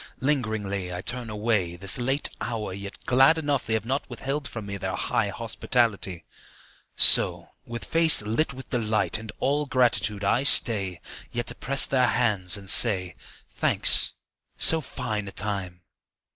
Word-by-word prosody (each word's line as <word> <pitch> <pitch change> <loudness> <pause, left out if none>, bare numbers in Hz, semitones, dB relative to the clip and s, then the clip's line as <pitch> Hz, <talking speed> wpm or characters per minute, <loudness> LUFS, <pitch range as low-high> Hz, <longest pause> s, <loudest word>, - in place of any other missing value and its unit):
Lingeringly 110 -9 -3
I 90 0 -7
turn 120 -2 -6
away, 105 -5 -3
This 95 +6 +2
late 135 +4 -2
hour, 110 -3 -6
yet 100 +1 -11
glad 135 +6 +2
enough 145 -4 -4
They 110 - -2
have 110 -1 -5
not 135 +4 -5
withheld 135 +4 -6
from 110 -3 -9
me 100 0 -8
Their - - -6
high - - -3
hospitality. 100 -8 -3 0.7
So, - - +5 0.2
with 120 0 -9
face 165 -8 +7
lit 115 +10 -3
with 130 0 -13
delight 110 -3 -1
And 110 -1 -11
all 145 +2 -2
gratitude, 115 -5 0
I 100 +5 0
stay 100 - +4 0.3
Yet 120 0 -5
to - - -1
press 135 +3 +2
their 130 -2 -1
hands 105 -5 -1
and 100 -1 -13
say, 95 -5 +5 0.3
"Thanks. - - +2 0.4
So 160 0 +4
fine 115 -7 -7
a - - -9
time 95 -3 -5
110 Hz, 155 wpm, -23 LUFS, 100-130 Hz, 0.7 s, face